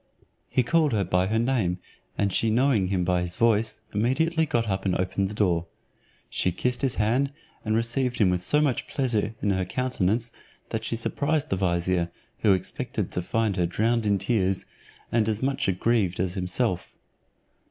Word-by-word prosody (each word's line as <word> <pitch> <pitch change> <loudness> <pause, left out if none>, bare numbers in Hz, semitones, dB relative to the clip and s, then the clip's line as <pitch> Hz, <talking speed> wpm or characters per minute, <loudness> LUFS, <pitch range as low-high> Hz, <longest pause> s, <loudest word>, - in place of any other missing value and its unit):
He 125 - +2
called 155 +1 +2
her 105 -2 +2
by 90 +1 +1
her 110 +3 0
name, 115 -7 +1 0.4
and 100 -2 +1
she 115 - +1
knowing 115 -4 +3
him 90 -1 0
by 90 0 +1
his 90 0 -3
voice, 110 -1 +2
immediately 160 +9 +1
got 120 -6 0
up, 95 -1 -1
and 95 -2 +1
opened 95 +1 0
the 105 - -7
door. 85 -5 +1 0.6
She 90 - 0
kissed 125 +8 -1
his 135 -3 +1
hand, 125 +6 +1 0.3
and 110 0 0
received 120 +2 0
him 95 -4 +4
with 90 -1 0
so 150 +11 +3
much 140 -5 0
pleasure 115 -5 -1
in 100 - +2
her 95 -1 +1
countenance, 115 +1 0 0.4
that 110 0 -3
she 115 - -2
surprised 145 +5 -1
the - - +3
vizier. 85 -1 0 0.3
who 100 - +4
expected 95 - -3
to 90 - -1
find 110 +2 0
her 90 -1 +2
drowned 110 +5 +1
in 100 -1 +3
tears, 95 -2 0 0.5
and 110 -2 +2
as 110 +2 -2
much 135 -3 0
grieved 110 -7 +1
as 90 -1 0
himself. 95 +2 -1
110 Hz, 180 wpm, -26 LUFS, 95-120 Hz, 0.6 s, him